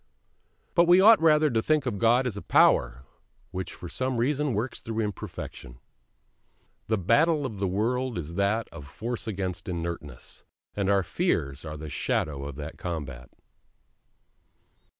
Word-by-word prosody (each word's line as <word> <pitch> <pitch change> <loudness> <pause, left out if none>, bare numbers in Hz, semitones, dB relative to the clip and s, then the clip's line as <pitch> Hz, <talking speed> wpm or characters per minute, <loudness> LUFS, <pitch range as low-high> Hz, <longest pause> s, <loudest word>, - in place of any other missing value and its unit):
But 170 0 +4
we 175 +1 +7
ought 215 +1 +7
rather 155 -2 +4
to 115 -1 +1
think 155 +2 +1
of 110 -6 -2
God 120 +3 +4
as 120 -5 -2
a 100 - -6
Power 60 +2 +3 0.5
which 95 0 -4
for 90 - -9
some 130 +7 -2
reason 140 +1 0
works 115 +5 -3
through 115 0 -4
imperfection. 75 - -6 1.1
The 110 - +1
battle 140 - +3
of 110 -6 -5
the 100 - 0
world 120 +5 -1
is 85 -1 -5
that 100 +4 0
of 80 -4 -10
force 115 - -5
against 95 -3 -4
inertness: 85 -6 -6 0.3
and 100 -1 -1
our 100 -1 +3
fears 70 -4 -1
are 75 0 -6
the 75 +1 -7
shadow 70 -1 -2
of 70 -1 -6
that 75 +2 -8
combat. 70 -8 -5
100 Hz, 150 wpm, -27 LUFS, 80-125 Hz, 1.1 s, we